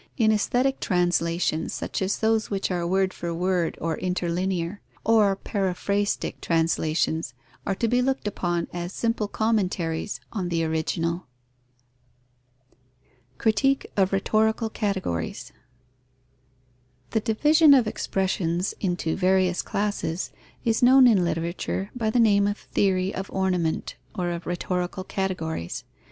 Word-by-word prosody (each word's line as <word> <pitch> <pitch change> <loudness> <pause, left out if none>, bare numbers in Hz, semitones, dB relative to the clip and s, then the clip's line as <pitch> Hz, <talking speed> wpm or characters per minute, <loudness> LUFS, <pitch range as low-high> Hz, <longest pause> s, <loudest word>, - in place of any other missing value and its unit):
In 220 -4 +4
aesthetic 250 +5 +1
translations, 175 -3 0
such - - -3
as 190 +1 0
those 220 0 +1
which 195 -1 -1
are 175 -1 -1
word 190 +1 +1
for 170 0 -4
word 180 -1 0
or 165 -1 -2
interlinear, 180 +1 -1 0.2
or 215 -3 +4
paraphrastic 200 +1 -1
translations, 160 -1 0 0.3
are 195 - +1
to 230 - 0
be 245 +2 +2
looked 265 -3 0
upon 175 -4 -1
as 175 +1 -4
simple 230 -2 -1
commentaries 195 -6 -1
on 185 -5 -2
the 165 -1 0
original. 165 +2 -1 2.1
Critique 270 - +1
of 190 -2 +2
rhetorical 220 +3 +1
categories. 190 - -3 1.6
The 220 - +2
division 295 +8 +5
of 250 -4 +4
expressions 185 -3 -1
into 175 -4 -1
various 185 -1 +2
classes 200 -4 -2 0.3
is 225 -1 +2
known 255 +1 +7
in 215 -7 +5
literature 170 +3 -2
by 225 -3 0
the 240 - +2
name 200 -3 +4
of 205 +1 -1
theory 190 -1 0
of 190 +1 -5
ornament 180 -4 -1 0.2
or 175 -1 -1
of 170 0 -5
rhetorical 180 +1 -2
categories. 180 - -3
190 Hz, 120 wpm, -25 LUFS, 175-215 Hz, 2.1 s, known